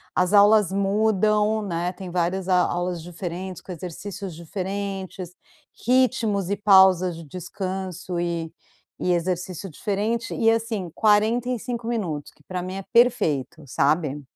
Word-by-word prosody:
as 180 +2 +2
aulas 205 -2 +6
mudam, 210 +2 +2
né, 175 -3 -2
tem 185 -1 -8
várias 180 +2 -1
a 185 - +4
aulas 175 0 -1
diferentes 175 +2 -6
com 185 - -10
exercícios 185 +2 -7
diferentes, 190 0 -5 0.5
ritmos 240 -6 +2
e 200 - 0
pausas 190 -3 +5
de 165 - -9
descanso 185 +2 -5
e 170 -2 -2 0.5
e 180 - +2
exercício 180 +1 -2
diferente, 215 +7 -2
e 225 -1 +4
assim, 225 -5 -2
45 235 +2 +1
minutos, 180 -11 -3
que 150 - -27
pra 180 +2 -4
mim 185 +1 -5
é 195 0 -5
perfeito, 205 - +2
sabe? 145 +2 +1
190 Hz, 130 wpm, -24 LUFS, 175-210 Hz, 0.5 s, aulas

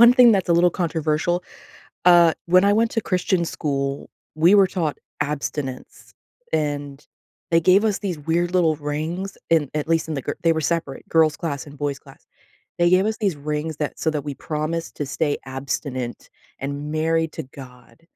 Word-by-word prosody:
one 235 +1 +9
thing 250 -2 +7
that's 195 -4 +1
a 170 - +4
little 175 +1 +4
controversial, 170 0 -1 0.6
uh, 175 -2 +7
when 185 +2 +5
I 200 - +4
went 225 +1 +2
to 225 - 0
Christian 180 -1 0
school, 140 -4 -3 0.3
we 165 +5 +5
were 200 -2 +6
taught 160 -6 -2 0.2
abstinence, 145 -2 -4 0.4
and 145 -1 -2 0.4
they 165 -1 +4
gave 185 +5 +4
us 210 -3 +1
these 185 -6 -3
weird 170 +4 0
little 165 -4 +3
rings 155 +6 -4
in, 155 -5 +3
at 150 0 -2
least 165 -1 +1
in 155 - -2
the 135 - -3
gir - - -4
they 165 -1 +4
were 160 - -1
separate, 165 -5 -2
girls 160 -2 +3
class 145 -5 -4
and 145 0 -12
boys 145 -2 -2
class. - - -18 0.5
They 175 0 +4
gave 185 +2 +4
us 220 +1 -1
these 195 -6 +1
rings 150 +1 -3
that 150 - -3
so 160 - +1
that 150 -2 -3
we 145 - -3
promised 155 +4 -3
to 145 - -2
stay 145 +1 -1
abstinent 130 -2 -4 0.3
and 140 +2 -4
married 160 +1 +1
to 160 - -5
God. 130 +2 -14
160 Hz, 185 wpm, -22 LUFS, 145-175 Hz, 0.6 s, one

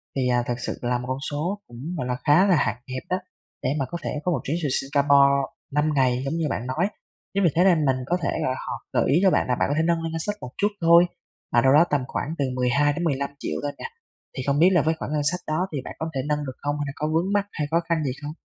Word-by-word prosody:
thì 130 -2 +1
à, 120 -1 +2
thực 120 0 -2
sự - - -4
là 120 0 0
một 125 - -6
con 130 +1 -2
số 175 +8 -2
cũng, 120 - -12 0.2
gọi 125 - -3
là, 125 - -1
khá 155 +6 +5
là 180 - +5
hạn 145 - +1 0.2
hẹp 130 - -4
á, 185 - +1 0.5
để - - +1
mà 135 - 0
có 170 - -2
thể - - -2
có 180 - +1
một 150 - 0
chuyến 150 - -1
từ 145 - +1
Singapore 140 0 +4 0.4
5 150 +1 +2
ngày 130 -2 +2
giống 140 - -2
như 165 -1 -1
bạn 120 +4 -3
nói. 160 +9 0 0.5
Chính 200 0 +1
vì 170 - +5
thế 175 - +5
nên 170 -6 +4
mình 135 - +3
có 175 +3 +1
thể, 140 - 0
gọi 130 - +1
là, 130 - -2
họ - - -2 0.2
gợi - - +2
ý 155 - +5
cho 190 - +5
bạn - - +2
là 125 - +1
bạn - - +1
có 145 - +1
thể 160 - +3
nâng 170 -1 +1
lên 165 - -3
ngân 165 - -3
sách 205 +5 -2
một 125 - -7
chút 205 - +3
thôi, 170 +1 +7 0.5
là 120 - +5
đâu 135 +1 +4
đó 150 - +7
tầm 145 -3 +1
khoảng 155 - -3
từ 140 - +1
12.000.000-15.000.000 140 +2 0
thôi 145 - -1
nè. - - -6 0.5
Thì 130 - -2
không 140 +1 +2
biết 175 - +7
là 175 -5 +4
với 160 +2 +1
khoản - - -4
ngân 150 -1 0
sách 180 - -3
đó 165 +5 0
thì - - -1
bạn - - -7
có 160 0 -2
thể 135 - 0
nâng 150 0 -1
được 130 -2 -6
không? 145 0 -2
Hay 145 - -1
là 135 - -5
có 150 - -2
vướng 175 +5 +1
mắc 205 -1 +2
hay 150 -2 -3
khó 170 - +4
khăn 165 -2 +1
gì 135 - -1
không? 145 0 -5
145 Hz, 295 wpm, -24 LUFS, 135-170 Hz, 0.5 s, thôi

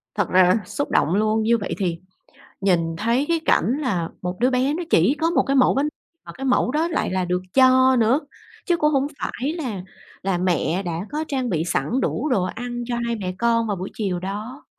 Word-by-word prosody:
Thật 205 - 0
ra 185 0 +5
là 180 +4 +4
xúc 285 - -4
động 170 +5 +2
luôn, 215 +1 +1
như 235 +1 +3
vậy 205 - -4
thì 175 -4 -2 0.6
nhìn 170 -4 +1
thấy 235 +8 +1
cái 335 -1 +2
cảnh 255 +5 +2
là 180 - -1
một 180 0 -4
đứa 250 +3 +3
bé 260 +2 +1
nó 345 +3 -3
chỉ 195 - +4
có 330 - +3
một 340 - +2
cái 275 - 0
mẫu 260 - +5
bánh 280 +3 +1 0.4
mà - - -8
cái 270 - -6
mẫu 250 -1 +2
đó 315 +3 +1
lại 330 - -1
là 185 -1 0
được 180 +1 -1
cho 260 0 +5
nữa, 235 +3 +3 0.5
chứ 345 -1 +2
cũng 300 -1 +2
hông 275 -1 +1
phải 275 +6 -3
là 245 - -4 0.4
là 190 -2 0
mẹ 180 +1 0
đã 170 +2 -4
có 305 +1 -2
trang 260 -4 -2
bị 160 -3 0
sẵn 175 - -1
đủ 305 - -1
đồ 220 -9 +2
ăn 240 +5 -4
cho 240 - -2
hai 235 0 -1
mẹ 185 -3 -4
con 230 -1 +1
vào 205 - -1
buổi 185 +1 -5
chiều 190 -5 -2
đó. 210 - -6
230 Hz, 225 wpm, -22 LUFS, 185-265 Hz, 0.6 s, ra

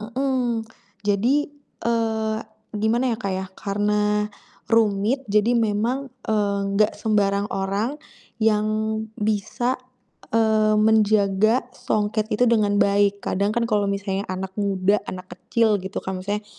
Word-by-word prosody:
Mhm, 245 0 -1 0.4
jadi, 205 +6 +2 0.5
eee, 220 -2 0 0.3
gimana 220 +4 +1
ya, - - -1
Kak, 195 -1 -2
ya, 190 0 -4
karena 210 +1 0 0.4
rumit 225 +4 +2
jadi 210 +3 +3
memang, 235 +4 0 0.2
eee, 205 -2 0 0.2
gak 210 - +4
sembarang 200 -2 +1
orang 200 +9 -2 0.4
yang 215 -1 +3 0.6
bisa, 220 +4 0 0.6
eee, 220 -1 +3
menjaga 215 +2 +3
songket 215 +1 -1
itu 245 +3 +3
dengan 210 -3 +2
baik, 200 0 +3
kadang 200 +3 0
kan 235 0 0
kalau 205 -2 +2
misalnya 200 0 -2
anak 190 +1 -5
muda, 200 0 +2
anak 185 0 -7
kecil, 215 +4 +1
gitu 190 0 -5
kan, 190 -1 -4
misalnya, 205 +2 -3
210 Hz, 125 wpm, -23 LUFS, 200-225 Hz, 0.6 s, gak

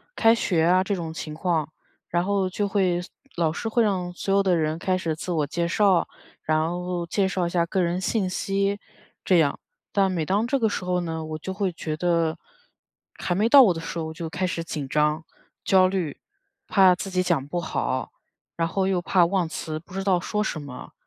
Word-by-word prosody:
开 225 0 +5
学 175 -8 +1
啊 180 +2 +4
这 200 +1 -1
种 165 -3 -5
情 155 -2 -6
况， 160 -2 0 0.4
然 175 +1 +1
后 195 -1 +1
就 205 +2 -1
会 190 -3 +1 0.4
老 165 -2 +1
师 225 - -3
会 230 +1 +3
让 185 -4 0
所 195 +2 -2
有 200 - +5
的 190 -2 +2
人 155 0 -1
开 185 +1 0
始 165 -4 -2
自 175 +3 -5
我 155 -4 +1
介 170 +4 -2
绍， 190 0 +3 0.3
然 155 0 +1
后 175 0 -3
介 190 +3 +1
绍 185 -2 -1
一 - - -1
下 170 -1 +2
个 180 +2 0
人 175 +2 -1
信 200 0 0
息 195 +2 -1 0.4
这 185 - +4
样， 145 -4 +2 0.3
但 195 -1 +3
每 165 -4 -1
当 205 +7 +1
这 275 - +1
个 230 -4 +2
时 205 - -3
候 180 0 0
呢， 160 -2 -4
我 155 0 -5
就 190 +4 -5
会 195 -1 -1
觉 160 -2 -4
得 165 -1 0 0.7
还 175 - -2
没 210 +4 +2
到 275 +3 +9
我 210 - +5
的 165 - -6
时 165 +1 -5
候 160 -1 -4
就 165 +1 -6
开 180 +3 -2
始 165 -2 -3
紧 150 -5 -5
张、 150 +2 +1 0.4
焦 185 -1 +5
虑， 185 -6 -2 0.5
怕 190 -3 +5
自 195 +2 -6
己 185 0 +1
讲 170 -7 0
不 175 +4 -2
好， - - -2 0.5
然 165 0 0
后 190 +3 0
又 190 -2 +1
怕 180 -1 +4
忘 180 -1 0
词， 155 0 -5
不 170 +3 -17
知 195 0 -3
道 190 -2 +2
说 210 +4 -1
什 185 - -3
么。 140 -3 -10
180 Hz, 235 characters per minute, -25 LUFS, 165-195 Hz, 0.7 s, 到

